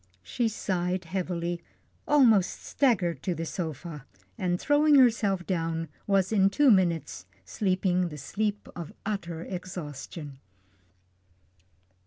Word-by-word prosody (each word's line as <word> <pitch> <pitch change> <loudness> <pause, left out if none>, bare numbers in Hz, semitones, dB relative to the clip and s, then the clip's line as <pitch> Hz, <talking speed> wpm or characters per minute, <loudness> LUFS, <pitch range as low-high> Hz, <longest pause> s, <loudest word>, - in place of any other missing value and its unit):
She 235 - -1
sighed 185 -3 -2
heavily, 175 -1 -3 0.5
almost 230 -10 +4
staggered 180 - +1
to 180 - -2
the 165 +1 -4
sofa, 160 -3 -5 0.3
and 180 -1 -1
throwing 295 +1 +4
herself 220 -8 +4
down, 165 -3 -2 0.2
was 195 -1 +2
in 195 -3 +4
two 275 +6 +4
minutes 165 - +1 0.2
sleeping 185 - 0
the 150 - -8
sleep 205 +8 -2
of 170 -3 -7
utter 175 -6 -3
exhaustion. 155 -6 -7
180 Hz, 110 wpm, -28 LUFS, 165-205 Hz, 0.5 s, almost